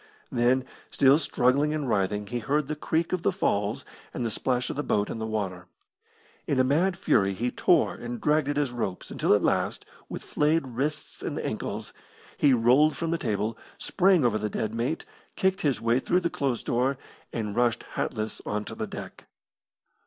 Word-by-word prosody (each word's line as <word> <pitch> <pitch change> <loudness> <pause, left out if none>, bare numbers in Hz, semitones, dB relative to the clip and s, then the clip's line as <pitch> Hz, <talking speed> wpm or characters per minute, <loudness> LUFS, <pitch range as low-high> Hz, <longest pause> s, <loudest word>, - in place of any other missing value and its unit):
Then, 125 +2 +2 0.2
still 140 +2 +5
struggling 140 +2 +2
and 150 -3 -2
writhing, 105 -1 0
he 120 +4 -3
heard 145 +5 0
the 155 - -2
creak 160 +3 -1
of 185 - 0
the 195 - +2
falls 105 - -1 0.3
and 120 - -2
the 115 - -1
splash 125 +2 0
of - - -6
the 145 - -1
boat 105 -7 0
in - - -5
the 110 - -3
water. 95 -5 -3 0.8
In 135 - +1
a - - +6
mad 170 +8 +2
fury 100 - +2
he 120 +5 -1
tore - - +3
and 120 0 -6
dragged 150 +1 +2
at 145 - -1
his 145 -4 +1
ropes, 105 -7 -4
until - - 0
at - - 0
last, - - 0 0.2
with - - -6
flayed 155 +1 +1
wrists 145 +6 -3
and - - -3
ankles, - - -4 0.4
he 145 - +4
rolled 130 +6 +4
from 165 -1 -2
the 165 - 0
table, 110 -2 -1 0.2
sprang 185 -6 +3
over 110 -3 +2
the 105 0 -2
dead 110 +1 -2
mate, 120 +8 -2 0.3
kicked 190 0 +1
his 140 -4 +1
way 115 +2 +2
through 180 +7 +1
the 170 -1 -1
closed 135 -4 -2
door, 130 +3 +1 0.3
and 105 -3 -3
rushed 120 -2 +2
hatless 110 0 -3
on 105 0 -2
to - - -7
the - - -4
deck. - - -9
125 Hz, 190 wpm, -27 LUFS, 110-150 Hz, 0.8 s, a